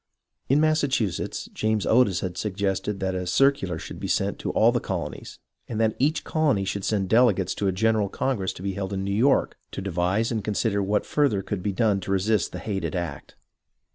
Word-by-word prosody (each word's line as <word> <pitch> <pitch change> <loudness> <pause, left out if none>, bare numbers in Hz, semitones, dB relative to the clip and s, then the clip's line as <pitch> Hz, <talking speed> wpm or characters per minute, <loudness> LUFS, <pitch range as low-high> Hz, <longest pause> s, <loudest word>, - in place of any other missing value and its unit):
In 140 +3 +4
Massachusetts, 145 - 0
James 110 -1 0
Otis 110 -6 +3
had 90 -2 -4
suggested 100 0 -2
that 95 -1 0
a 90 -1 -3
circular 95 - +2
should - - -8
be - - -4
sent - - 0
to - - -3
all - - +5
the - - 0
colonies, - - -5 0.3
and 110 - -4
that 110 -1 +2
each 150 +3 +1
colony 145 -11 +1
should 100 +1 -3
send 100 -2 0
delegates 105 -4 +3
to 100 - -1
a - - +3
general 110 +1 +1
congress 105 -8 -1
to 90 - -10
be 100 -1 -2
held 95 0 -4
in 95 0 -2
New 100 - -2
York 130 +7 +2
to - - -6
devise 95 +4 0
and 110 -3 -2
consider 105 0 0
what 100 +2 0
further 135 -10 +1
could 100 -1 -4
be 100 - -1
done 105 0 +2
to 95 - -5
resist 100 -1 +1
the - - -6
hated 95 +2 -3
act. 85 -2 -5
100 Hz, 200 wpm, -25 LUFS, 95-115 Hz, 0.3 s, all